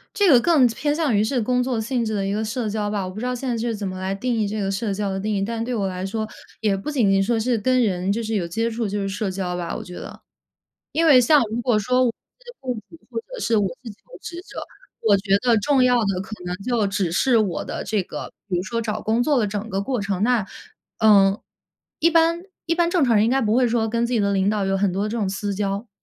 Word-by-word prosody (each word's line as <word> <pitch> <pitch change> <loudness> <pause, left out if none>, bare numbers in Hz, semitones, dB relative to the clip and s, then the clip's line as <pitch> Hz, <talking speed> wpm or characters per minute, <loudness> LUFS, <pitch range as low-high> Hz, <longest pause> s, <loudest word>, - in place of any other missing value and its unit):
这 405 -3 +4
个 250 - +8
更 300 -1 +4
偏 280 +5 -1
向 310 -6 +1
于 205 - +3
是 245 +3 0
工 250 +3 +1
作 250 -2 -1
性 235 +2 -1
质 215 -1 -2
的 195 -1 -1
一 195 - -1
个 210 +2 -1
社 220 +1 -2
交 210 0 -2
吧， 205 -2 -2
我 185 - -5
不 200 - -8
知 240 - -3
道 250 0 -1
现 255 +1 -4
在 235 - 0
是 230 0 -2
怎 205 -1 -5
么 185 -1 -4
来 190 +1 -2
定 245 +5 -2
义 220 -3 0
这 210 +1 -3
个 195 0 -1
社 200 +1 -2
交 200 0 -2
的 190 0 -2
定 210 +2 -1
义， 195 - 0
但 225 +2 -3
对 245 +2 -2
我 200 -3 0
来 185 0 -4
说， 220 +3 -2 0.4
也 210 -3 +2
不 195 - -5
仅 245 -9 +2
仅 195 0 +3
说 230 +4 +1
是 235 +2 +1
跟 255 +3 +2
人 185 -3 -1
就 225 +4 0
是 220 0 -2
有 180 -4 -1
接 225 +7 -1
触 225 -1 -2
就 205 +1 -2
是 195 - -2
社 205 +1 -2
交 185 -2 -3
吧， 175 -1 -4
我 - - -5
觉 180 - -11
得。 - - -9 0.7
因 330 +2 +1
为 275 -6 +7
像 290 +4 +5
如 230 +2 -2
果 235 -3 +2
说 250 +5 +2
我 240 - +2
是 485 - -17
雇 255 -2 -3 0.2
主 330 - -13
或 230 -2 -3
者 - - -10
是 230 - +1
我 205 -2 +2 0.2
自 235 - -7
己 - - -6
是 205 - -18
求 - - -14
职 340 - -7
者， - - -8 0.4
我 210 -2 +5
觉 195 0 +2
得 240 0 +3
重 270 +4 +2
要 250 -1 +4
的 195 -3 0
可 195 - -11
能 180 - -3
就 220 +2 0
只 195 -3 -1
是 240 +7 +3
我 200 -5 0
的 - - -5
这 205 -1 0
个 - - -7 0.2
比 180 - 0
如 175 - -2
说 230 +5 -2
找 215 -1 -3
工 225 +3 +1
作 285 -2 +2
的 215 - +1
整 205 +2 -4
个 195 -1 -1
过 250 0 -2
程。 200 0 -1
那 235 -4 +2 0.5
嗯， 200 -2 +5 0.6
一 335 - +4
般 335 +1 +3 0.2
一 335 - 0
般 340 0 +2
正 345 -5 +2
常 235 -3 +3
人 210 - +5
应 235 - +1
该 270 - +3
不 215 0 +1
会 255 0 +4
说 225 -1 +1
跟 235 +1 0
自 240 - -4
己 235 - +2
的 200 -1 +1
领 195 0 +2
导 210 -2 0
有 195 0 +1
很 195 -1 +1
多 195 +3 -1
这 225 +2 -3
种 205 -4 0
私 200 +1 -3
交。 200 +3 -2
220 Hz, 310 characters per minute, -22 LUFS, 195-250 Hz, 0.7 s, 个